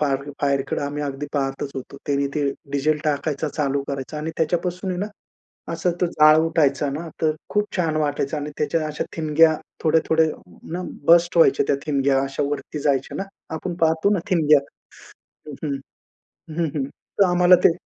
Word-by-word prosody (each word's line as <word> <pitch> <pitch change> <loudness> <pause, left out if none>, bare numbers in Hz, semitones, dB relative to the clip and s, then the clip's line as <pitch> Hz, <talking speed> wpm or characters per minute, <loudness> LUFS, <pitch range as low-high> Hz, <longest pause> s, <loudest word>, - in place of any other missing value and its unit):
Fire 140 -1 0
फायरकडे 140 -1 0
आम्ही 145 +1 -3
अगदी 140 +1 -4
पाहतच 135 -1 -2
होतो. 135 +1 -7
त्याने 140 -1 +1
ते 145 -2 +1 0.2
डीझेल 150 +2 +1
टाकायचा, 150 0 -1
चालू 140 -2 -1
करायचा 140 +2 -4
आणि 155 +2 -3
त्याच्यापासून 180 +3 -1
आहे 180 - -3
ना 205 - -1 0.7
असा 170 +2 0
तो 180 - +3
जाळ 155 -2 +6
उठायचा 150 -4 +2
ना, 160 +4 -5
तर 155 -1 +3 0.2
खूप 210 0 +2
छान 160 -3 0
वाटायचं 145 -1 -1
आणि 150 0 -4
त्याच्या 155 +2 0
अशा 150 0 -3
ठिणग्या 160 0 +4 0.3
थोड्या-थोड्याना 160 +2 0 0.3
बस्ट 170 +1 +5
व्हायच्या 140 -4 +5
त्या 140 - +3
ठिणग्या 140 -2 +2
अशा 135 +1 -2
वरती 145 +1 -4
जायच्या 140 -2 0
ना - - -2 0.3
आपण 175 +3 -4
पाहतो 160 +5 +3
ना 200 - +2
ठिणग्या 155 -5 +5 0.9
हं. 150 - -6 0.2
हं, 135 - -6 0.8
हं, 170 - +2
हं. 135 - 0 0.3
तर 200 - +7
आम्हाला 175 +1 +6
ते - - +7
150 Hz, 165 wpm, -23 LUFS, 140-165 Hz, 0.9 s, तर